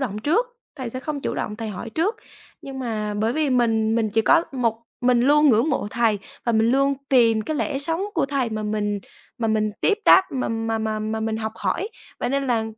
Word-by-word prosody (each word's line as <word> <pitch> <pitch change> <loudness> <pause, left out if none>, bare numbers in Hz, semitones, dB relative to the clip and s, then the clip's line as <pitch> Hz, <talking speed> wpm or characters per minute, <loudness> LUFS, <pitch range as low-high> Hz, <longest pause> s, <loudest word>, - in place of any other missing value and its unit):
động 215 -6 -2
trước, 340 - +1 0.3
thầy 255 -4 -5
sẽ 255 - -5
không 295 +1 -4
chủ - - -3
động 210 - -3
thầy 225 -1 -5
hỏi 215 +3 -6
trước. 370 - 0 0.5
Nhưng 270 -1 -7
mà 215 -4 -3
bởi 220 +3 0
vì 305 0 0
mình 225 -3 +2
mình 220 -2 +1
chỉ 225 - +2
có 330 +6 +4
một 230 -3 -1 0.2
mình 245 -1 +3
luôn 295 +4 +5
ngưỡng 235 +4 +4
mộ 265 -7 -1
thầy 230 -3 +1 0.3
và 235 - +1
mình 220 0 +3
luôn 275 +2 +3
tìm 230 -4 +4
cái 310 +3 -3
lẽ 270 - -1
sống 325 +5 -2
của 295 -5 +1
thầy 270 -4 -1
mà 215 0 -3
mình 210 -1 -1 0.4
mà 225 -2 0
mình 215 -1 +1
tiếp 420 - +2
đáp, 380 - +8
mà 260 -2 -1
mà 225 0 -1
mà 220 0 -2
mà 220 +1 -3
mình 220 0 -1
học 220 0 -3
hỏi, 400 - -1 0.3
vậy - - -1
nên 275 +1 0
là 235 -3 +1
235 Hz, 230 wpm, -23 LUFS, 220-275 Hz, 0.5 s, đáp